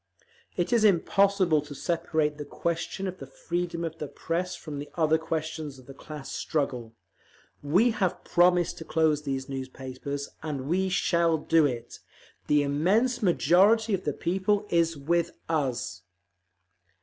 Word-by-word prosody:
It 175 +3 0
is 230 -2 +4
impossible 195 -3 +3
to 145 0 -10
separate 160 -2 -1
the - - -3
question 170 +5 -3
of 185 0 -6
the 135 - -8
freedom 170 +4 -3
of 165 -1 -5
the 150 - -4
Press 175 +5 -3
from 150 -3 -7
the 145 - -7
other 160 -1 +3
questions 160 -3 -4
of 130 - -15
the 135 - -10
class 150 -1 -9
struggle. 125 -7 -2 0.7
We 185 +12 +3
have 195 -5 -1
promised 175 -1 +3
to - - -6
close 160 -2 +2
these 135 -2 -3
newspapers, 135 +1 -5
and 145 -4 -4
we 190 +4 +1
shall 170 -3 +2
do 160 0 +3
it. 120 -3 -6 0.5
The 150 -1 +4
immense 195 - +2
majority 200 +5 +4
of 190 - -1
the 150 - -1
people 195 +6 0
is 165 -2 +2
with 170 +4 0
us! 130 - -2
160 Hz, 150 wpm, -27 LUFS, 145-180 Hz, 0.7 s, is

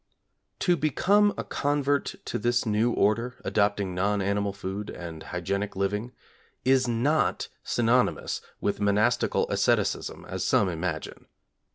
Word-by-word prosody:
To 175 -2 +3
become 200 - +3
a - - -2
convert 145 0 0
to - - -3
this 120 +1 +1
new 110 +2 +2
order, 115 +4 +1
adopting 100 -2 +1
non 100 +3 +1
animal 100 +1 0
food 100 +1 -5
and 85 -3 -7
hygienic 100 +4 -3
living, 105 +5 -1 0.5
is 130 -1 +4
not 125 +7 +1
synonymous 120 +1 +1 0.2
with 100 - -1
monastical 105 +4 +2
asceticism, - - 0
as - - -4
some 95 - +3
imagine. 85 -2 -4
105 Hz, 125 wpm, -27 LUFS, 100-125 Hz, 0.5 s, is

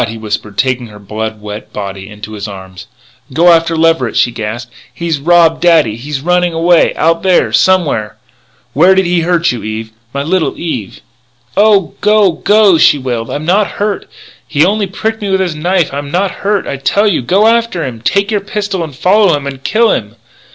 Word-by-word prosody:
he 115 - -6
whispered, 105 -2 -5
taking 125 -2 0
her 105 -1 -13
blood 110 +2 -5
wet 105 +1 -8
body 100 -1 -6
into 105 0 -10
his 105 -1 -6
arms. 95 0 -10 0.5
"Go 170 +5 +4
after 165 0 +3
Leverett," 160 -7 +1
she 120 - +2
gasped. 115 +2 -6 0.2
"He's 165 -3 -3
robbed 165 +1 +3
daddy. 160 -11 +3
He's 135 +4 -5
running 180 +2 +1
away 165 +1 +3
out 165 +1 +1
there 185 -2 +2
somewhere 160 - +1 0.3
" - - -38
"Where 180 +6 +4
did 190 0 +2
he 175 0 +1
hurt 170 0 +1
you, 120 -3 -5
Eve 110 +1 -6 0.2
my 140 +1 -3
little 170 +2 -1
Eve 125 - -5 0.3
" 120 -1 -42
"Oh, 205 -4 +3
go! 210 -2 +4
go!" 200 0 +3
she 150 - +5
wailed, 120 -4 -4
"I'm 150 +2 -4
not 195 +4 +2
hurt. 205 -1 -2 0.4
He 150 +3 +2
only 205 +1 0
pricked 220 +4 -3
me 205 - -3
with 190 0 +1
his 185 -4 -1
knife. 175 0 0
I'm 140 0 -5
not 185 +4 0
hurt, 200 -1 -2
I 140 - -4
tell 200 +10 +1
you. 190 -9 +1
Go 190 - +2
after 230 -7 +1
him! 120 -4 -7
Take 200 - 0
your 205 -2 0
pistol 200 -3 -3
and 150 -4 -8
follow 190 +2 +3
him 145 -1 -5
and 135 -1 -7
kill 225 +1 +2
him!" 105 +1 -3
165 Hz, 200 wpm, -13 LUFS, 120-190 Hz, 0.5 s, she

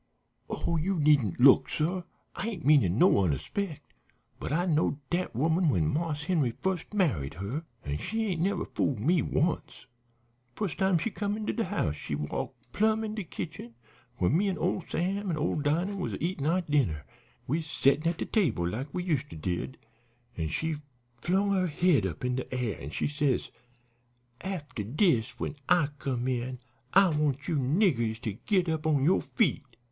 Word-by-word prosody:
"Oh, 170 - -1
you 180 +3 0
needn't 145 - +3
look, 130 +2 +7
suh! 175 +4 0 0.3
I 220 - -2
ain't 190 -9 -6
meanin' 135 - +5
no 180 - +5
onrespect, 135 - -2 0.5
but - - -4
I 170 +4 +1
knowed 155 -4 +2
dat 175 -7 -1
woman 160 +6 +2
when 80 - +1
Marse 150 -2 -1
Henry 155 -6 +1
fust 190 -3 -2
married 135 - 0
her, 110 - -4 0.2
an' 70 +1 -2
she 225 +3 -2
ain't 170 -4 -1
never 195 0 0
fooled 130 -6 -1
me 165 - +3
once. 160 +4 -1 0.7
Fust 200 -6 -3
time 190 -2 +3
she 215 +7 -2
come 205 +1 -2
into 215 0 -2
de 230 - -1
house 90 - -1
she 70 - -4
walked 75 0 -5
plumb 220 +1 +2
in 215 -1 -3
de 215 -2 -3
kitchen, 155 -8 -7 0.4
where 90 -5 +2
me 195 +7 +3
an' 190 - -2
old 185 +1 -1
Sam 195 +3 -1
an' 165 - -1
ole 155 +1 0
Dinah 170 +7 0
was 190 - -3
a - - -5
eaten 170 -5 -1
our 180 +3 +2
dinner, 135 - 0 0.4
we 155 +6 0
setten 150 0 +2
at 170 0 0
de - - -2
table 165 - +1
like 130 +11 -4
we 180 - -1
useter 150 - -1
did, 90 - -3 0.6
and 80 -2 -2
she 160 - -1 0.4
flung 195 +5 +2
her 185 -1 +2
head 150 - +3
up 90 +7 -5
in 125 0 0
de 130 - -5
air 125 -6 -1
and 70 - -6
she - - -1
says: 145 -3 0 0.9
'After 165 - -4
dis 125 - +1
when 150 - -3
I 160 -5 +4
come 125 -2 -2
in 125 0 -2 0.3
I 195 0 +6
want 150 -3 0
you 170 - 0
niggers 130 - +2
to 110 - -3
git 180 - 0
up 160 -1 -1
on 145 -4 +3
yo' 180 - +4
feet.' 225 - +1
155 Hz, 185 wpm, -29 LUFS, 125-185 Hz, 0.9 s, look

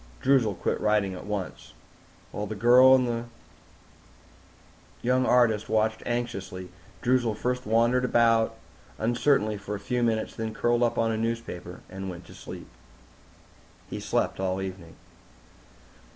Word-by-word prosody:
Droozle 130 -7 +3
quit - - -2
writing 105 -2 +2
at 90 - -9
once. 105 -3 -5 0.6
While 105 0 -4
the 110 - -5
girl 125 +4 +7
and 130 -1 +2
the 120 0 -2 1.8
young 130 +1 +2
artist 115 -4 +3
watched 110 0 +1
anxiously, 100 -6 -4 0.3
Droozle 120 -3 +2
first 125 +1 -2
wandered 115 +3 +3
about 115 -2 +3 0.4
uncertainly 110 -2 +1
for 100 +1 -5
a - - -6
few 125 +5 -2
minutes 115 -2 0
and 110 - -1
then 110 - -7
curled 120 0 +2
up 120 0 +1
on 115 0 +2
a 110 - -1
newspaper 110 -6 -4
and 95 0 -6
went 90 -1 -8
to - - -13
sleep. - - -9 1.3
He - - -4
slept - - -1
all 95 0 -1
evening. 95 -3 -7
115 Hz, 140 wpm, -27 LUFS, 100-120 Hz, 1.8 s, girl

